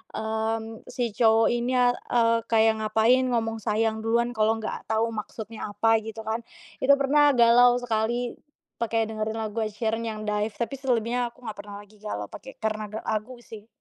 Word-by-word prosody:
mmm, 220 Hz, 0 st, -3 dB
si 240 Hz, -2 st, -2 dB
cowok 225 Hz, +1 st, +4 dB
ini, 240 Hz, +2 st, 0 dB
eee, 245 Hz, -2 st, +2 dB
kayak 220 Hz, -1 st, +3 dB
ngapain, 225 Hz, +4 st, +3 dB
ngomong 225 Hz, -2 st, -1 dB
sayang 220 Hz, +1 st, 0 dB
duluan, 235 Hz, +2 st, +1 dB
kalau 220 Hz, -1 st, +2 dB
enggak 225 Hz, -1 st, -6 dB
tahu 225 Hz, +1 st, +1 dB
maksudnya 220 Hz, 0 st, -6 dB
apa 225 Hz, +2 st, +3 dB
gitu 220 Hz, 0 st, -8 dB
kan. 220 Hz, +1 st, -2 dB, 0.4 s
Itu 280 Hz, +2 st, +5 dB
pernah 285 Hz, +1 st, +4 dB
galau 245 Hz, +1 st, +6 dB
sekali 240 Hz, +1 st, -1 dB, 0.4 s
pakai 225 Hz, -1 st, +1 dB
dengerin 215 Hz, 0 st, -3 dB
lagu 220 Hz, 0 st, -3 dB
Ed 215 Hz, -2 st, -2 dB
Sheeran 225 Hz, 0 st, -1 dB
yang 215 Hz, -1 st, -5 dB
Dive. 210 Hz, 0 st, -1 dB
Tapi 235 Hz, +3 st, -3 dB
selebihnya 245 Hz, -2 st, 0 dB
aku 255 Hz, -, -23 dB
enggak 215 Hz, -3 st, -7 dB
pernah 205 Hz, 0 st, -8 dB
lagi 210 Hz, +1 st, -21 dB
galau 105 Hz, -, -5 dB
pakai 265 Hz, -, -10 dB
karena 215 Hz, -1 st, -1 dB, 0.2 s
lagu 220 Hz, +4 st, -3 dB
sih. 220 Hz, -1 st, -11 dB
225 Hz, 170 wpm, -26 LUFS, 220-240 Hz, 0.4 s, galau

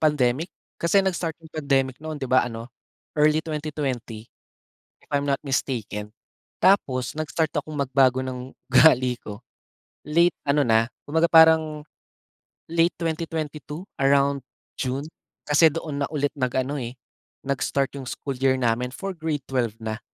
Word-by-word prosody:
pandemic. 150 Hz, +1 st, +1 dB, 0.3 s
Kasi 170 Hz, +4 st, +3 dB
nag-start 175 Hz, -4 st, -1 dB
yung 160 Hz, -1 st, -16 dB
pandemic 135 Hz, -4 st, +1 dB
noon, 155 Hz, -1 st, -5 dB
'di 135 Hz, -, -3 dB
ba 130 Hz, +1 st, +4 dB
ano, 115 Hz, -1 st, -6 dB, 0.5 s
early 150 Hz, 0 st, +4 dB
2020, 140 Hz, -8 st, -4 dB, 0.7 s
if -, -, -27 dB
I'm 140 Hz, 0 st, +2 dB
not 140 Hz, -1 st, +1 dB
mistaken. 110 Hz, -6 st, -2 dB, 0.5 s
Tapos 130 Hz, -10 st, +2 dB
nag-start 155 Hz, 0 st, -1 dB
akong 155 Hz, -, -3 dB
magbago 130 Hz, -2 st, +3 dB
ng 130 Hz, 0 st, -6 dB, 0.2 s
ugali 130 Hz, -2 st, +5 dB
ko, 105 Hz, -1 st, -8 dB, 0.7 s
late 170 Hz, +4 st, +3 dB
ano 145 Hz, 0 st, +3 dB
na, 115 Hz, 0 st, +4 dB, 0.2 s
kumbaga 160 Hz, +3 st, +3 dB
parang, 160 Hz, -2 st, +6 dB, 0.9 s
late 170 Hz, +1 st, +3 dB
2022, 160 Hz, -1 st, -4 dB, 0.2 s
around 140 Hz, 0 st, +3 dB, 0.4 s
June. 130 Hz, +2 st, -2 dB, 0.4 s
Kasi 150 Hz, +2 st, +5 dB
doon 150 Hz, -2 st, -4 dB
na -, -, -3 dB
ulit 145 Hz, -1 st, 0 dB
nag-ano 130 Hz, +2 st, -1 dB
eh, 120 Hz, +1 st, -6 dB, 0.5 s
nag-start 140 Hz, 0 st, -1 dB
yung 130 Hz, -, -7 dB
school 135 Hz, -3 st, -5 dB
year 130 Hz, -1 st, +3 dB
namin 125 Hz, 0 st, 0 dB
for 195 Hz, +7 st, -5 dB
grade 155 Hz, -4 st, -3 dB
12 120 Hz, -5 st, -1 dB
na, 110 Hz, 0 st, -4 dB
140 Hz, 135 wpm, -24 LUFS, 130-155 Hz, 0.9 s, parang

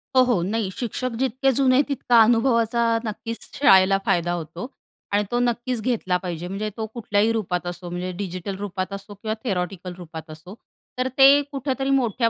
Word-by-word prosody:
हो, 260 Hz, -, +7 dB
हो. 245 Hz, -8 st, +1 dB
नाही 210 Hz, +1 st, -1 dB
शिक्षक 250 Hz, +4 st, -3 dB
जितके 265 Hz, +1 st, +1 dB
जुने 265 Hz, 0 st, +4 dB
तितका 255 Hz, -4 st, +3 dB
अनुभवाचा 230 Hz, 0 st, +2 dB, 0.2 s
नक्कीच 230 Hz, +1 st, -5 dB
शाळेला 195 Hz, -8 st, +6 dB
फायदा 175 Hz, 0 st, +1 dB
होतो. 170 Hz, +4 st, -5 dB, 0.4 s
आणि 205 Hz, +1 st, +2 dB
तो 240 Hz, -, +1 dB
नक्कीच 240 Hz, 0 st, -1 dB
घेतला 215 Hz, -7 st, 0 dB
पाहिजे 175 Hz, -1 st, -4 dB
म्हणजे 200 Hz, +3 st, -3 dB
तो 220 Hz, -, -2 dB
कुठल्याही 215 Hz, -2 st, +1 dB
रूपात 180 Hz, -6 st, -2 dB
असो 175 Hz, 0 st, -6 dB
म्हणजे 180 Hz, +1 st, -4 dB
डिजिटल 190 Hz, 0 st, -4 dB
रूपात 195 Hz, -1 st, -4 dB
असो 200 Hz, +1 st, -8 dB
किंवा 215 Hz, +2 st, -4 dB
थेरॉटिकल 180 Hz, -3 st, -3 dB
रूपात 165 Hz, -2 st, -9 dB
असो, 160 Hz, +5 st, -11 dB, 0.4 s
तर 255 Hz, 0 st, 0 dB
ते 275 Hz, +1 st, +8 dB
कुठेतरी 270 Hz, -1 st, -2 dB
मोठ्या 240 Hz, -4 st, +2 dB
215 Hz, 165 wpm, -23 LUFS, 185-245 Hz, 0.4 s, ते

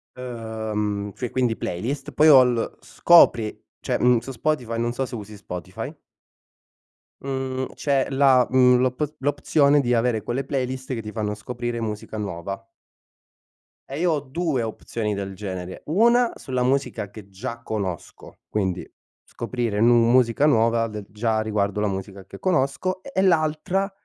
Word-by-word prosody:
uhm, 110 Hz, -4 st, -3 dB
cioè 125 Hz, -2 st, -3 dB
quindi 125 Hz, -3 st, +1 dB
playlist, 130 Hz, +11 st, -4 dB
poi 155 Hz, -, +5 dB
ho 130 Hz, -3 st, +9 dB
l 120 Hz, -2 st, -1 dB
scopri 120 Hz, -10 st, +5 dB, 0.3 s
cioè, -, -, -1 dB
mhmm, 125 Hz, -1 st, +4 dB
su 135 Hz, -, -8 dB
Spotify 125 Hz, -3 st, -1 dB
non 120 Hz, 0 st, 0 dB
so 135 Hz, +1 st, -1 dB
se -, -, -7 dB
usi 105 Hz, -1 st, -8 dB
Spotify 90 Hz, -4 st, -7 dB, 1.3 s
mhmm, 130 Hz, -1 st, -3 dB
c'è 140 Hz, -2 st, +1 dB
la, 135 Hz, -2 st, +5 dB
mhmm 125 Hz, -1 st, +5 dB
l'op 130 Hz, +4 st, -1 dB
l'opzione 145 Hz, +1 st, +3 dB
di 125 Hz, -1 st, 0 dB
avere 115 Hz, -2 st, +1 dB
quelle 130 Hz, +3 st, -2 dB
playlist 130 Hz, -1 st, -3 dB
che 115 Hz, -, -3 dB
ti 105 Hz, -1 st, -7 dB
fanno 105 Hz, -2 st, -2 dB
scoprire 120 Hz, +2 st, -4 dB
musica 110 Hz, -1 st, -5 dB
nuova. 100 Hz, 0 st, -5 dB, 1.2 s
E 140 Hz, +3 st, -5 dB
io 175 Hz, -1 st, +2 dB
ho 150 Hz, -, 0 dB
2 145 Hz, -2 st, -1 dB
opzioni 110 Hz, -1 st, -3 dB
del 100 Hz, -1 st, -5 dB
genere: 95 Hz, -2 st, -6 dB
una 235 Hz, +8 st, +4 dB
sulla 130 Hz, -1 st, -2 dB
musica 125 Hz, -5 st, 0 dB
che 105 Hz, -1 st, -12 dB
già 115 Hz, +5 st, -6 dB
conosco, 100 Hz, -7 st, -5 dB
quindi 95 Hz, -4 st, -2 dB, 0.4 s
scoprire 115 Hz, -3 st, -3 dB
nu 120 Hz, +1 st, +6 dB
musica 125 Hz, +2 st, +4 dB
nuova 115 Hz, -4 st, +3 dB
de 105 Hz, -1 st, -7 dB
già 110 Hz, +1 st, 0 dB
riguardo 105 Hz, -1 st, -1 dB
la 105 Hz, -, +1 dB
musica 95 Hz, 0 st, -6 dB
che -, -, -11 dB
conosco; 185 Hz, +2 st, 0 dB
e 275 Hz, -, -10 dB
e 190 Hz, -, +2 dB
l'altra, 180 Hz, +2 st, +1 dB
120 Hz, 150 wpm, -24 LUFS, 105-135 Hz, 1.3 s, ho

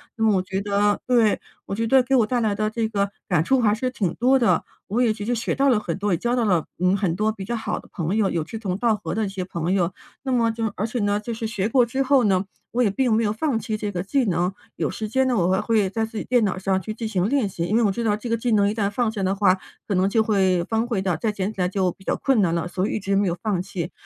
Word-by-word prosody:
那 225 Hz, -, -2 dB
么 215 Hz, -3 st, +4 dB
我 185 Hz, -, 0 dB
觉 190 Hz, +1 st, -3 dB
得 205 Hz, 0 st, +1 dB
对， 235 Hz, -4 st, +3 dB, 0.3 s
我 -, -, -5 dB
觉 225 Hz, +3 st, -1 dB
得 260 Hz, +2 st, +5 dB
给 270 Hz, +2 st, +1 dB
我 230 Hz, -, +4 dB
带 245 Hz, 0 st, 0 dB
来 215 Hz, -3 st, +1 dB
的 215 Hz, +1 st, -1 dB
这 225 Hz, 0 st, -1 dB
个 200 Hz, -2 st, -1 dB, 0.2 s
感 175 Hz, -4 st, +2 dB
触 265 Hz, +9 st, +2 dB
还 210 Hz, -3 st, +3 dB
是 255 Hz, +4 st, -1 dB
挺 200 Hz, -10 st, -2 dB
多 255 Hz, +3 st, +3 dB
的。 240 Hz, -3 st, +2 dB, 0.2 s
我 220 Hz, +5 st, 0 dB
也 230 Hz, -3 st, +3 dB
其 215 Hz, -, -7 dB
实 245 Hz, -, 0 dB
学 230 Hz, -1 st, -1 dB
到 275 Hz, +1 st, +3 dB
了 240 Hz, -5 st, +3 dB
很 170 Hz, -5 st, -4 dB
多， 205 Hz, +1 st, -1 dB
也 175 Hz, -, +2 dB
交 240 Hz, +5 st, 0 dB
到 240 Hz, -, +1 dB
了 180 Hz, -7 st, +2 dB
嗯， 180 Hz, +2 st, +3 dB
很 185 Hz, -4 st, 0 dB
多 215 Hz, +3 st, +1 dB
比 200 Hz, -3 st, -7 dB
较 235 Hz, +4 st, -2 dB
好 225 Hz, -, -3 dB
的 -, -, -15 dB
朋 180 Hz, +3 st, -1 dB
友， 205 Hz, -3 st, +2 dB
有 165 Hz, -2 st, -1 dB
志 220 Hz, +8 st, -7 dB
同 190 Hz, -4 st, -2 dB
道 230 Hz, +1 st, +2 dB
合 210 Hz, -, -4 dB
的 220 Hz, -1 st, 0 dB
一 -, -, -3 dB
些 190 Hz, -2 st, -4 dB
朋 170 Hz, -1 st, -3 dB
友。 185 Hz, -2 st, +1 dB, 0.3 s
那 265 Hz, -2 st, -1 dB
么 230 Hz, -2 st, +2 dB
就 225 Hz, 0 st, -3 dB
而 210 Hz, -, -1 dB
且 230 Hz, +2 st, -3 dB
呢， 205 Hz, 0 st, +1 dB
就 225 Hz, +3 st, -4 dB
是 225 Hz, 0 st, -3 dB
学 210 Hz, -2 st, -2 dB
过 245 Hz, 0 st, +4 dB
之 265 Hz, +4 st, -1 dB
后 265 Hz, -2 st, +3 dB
呢， 190 Hz, -2 st, +2 dB, 0.3 s
我 245 Hz, +1 st, +1 dB
也 215 Hz, -, +3 dB
并 245 Hz, +3 st, +1 dB
没 225 Hz, +1 st, +2 dB
有 205 Hz, -, +1 dB
放 240 Hz, +3 st, -1 dB
弃 220 Hz, -1 st, -3 dB
这 210 Hz, -1 st, -3 dB
个 180 Hz, -3 st, -3 dB
技 260 Hz, +6 st, +1 dB
能， 180 Hz, -1 st, 0 dB, 0.2 s
有 -, -, -1 dB
时 215 Hz, -, -4 dB
间 265 Hz, +5 st, +1 dB
呢， 245 Hz, -, +1 dB
我 175 Hz, -1 st, +2 dB
还 190 Hz, +2 st, +2 dB
会 215 Hz, -3 st, +1 dB
在 220 Hz, +2 st, -1 dB
自 225 Hz, 0 st, -8 dB
己 -, -, -3 dB
电 245 Hz, -2 st, +2 dB
脑 195 Hz, -3 st, 0 dB
上 190 Hz, 0 st, 0 dB
去 215 Hz, +4 st, -5 dB
进 225 Hz, 0 st, -4 dB
行 195 Hz, -2 st, 0 dB
练 275 Hz, -5 st, +2 dB
习。 175 Hz, -3 st, -4 dB
因 210 Hz, +6 st, +1 dB
为 235 Hz, -, +3 dB
我 210 Hz, -, +3 dB
知 235 Hz, +5 st, -2 dB
道 210 Hz, -2 st, +1 dB
这 225 Hz, +3 st, -7 dB
个 230 Hz, -, +1 dB
技 235 Hz, +1 st, -1 dB
能 205 Hz, -2 st, +4 dB
一 -, -, -1 dB
旦 205 Hz, -2 st, 0 dB
放 240 Hz, +1 st, 0 dB
下 215 Hz, -3 st, -3 dB
的 190 Hz, +1 st, +1 dB
话， 195 Hz, -2 st, +3 dB, 0.3 s
可 200 Hz, -, 0 dB
能 185 Hz, +2 st, +2 dB
就 220 Hz, +2 st, +3 dB
会 190 Hz, -5 st, +2 dB
荒废 225 Hz, -1 st, -1 dB
掉， 185 Hz, -3 st, 0 dB
再 215 Hz, +7 st, -1 dB
捡 205 Hz, 0 st, -3 dB
起 195 Hz, -, -4 dB
来 180 Hz, -, +1 dB
就 190 Hz, -2 st, +1 dB
比 190 Hz, -, -20 dB
较 -, -, -1 dB
困 265 Hz, -6 st, +2 dB
难 170 Hz, -3 st, +2 dB
了， 170 Hz, 0 st, -1 dB
所 185 Hz, +1 st, -2 dB
以 -, -, -2 dB
一 -, -, -3 dB
直 195 Hz, 0 st, -1 dB
没 195 Hz, -1 st, +2 dB
有 170 Hz, -, -3 dB
放 205 Hz, -5 st, 0 dB
弃。 180 Hz, -2 st, -5 dB
210 Hz, 340 characters per minute, -23 LUFS, 190-230 Hz, 0.3 s, 得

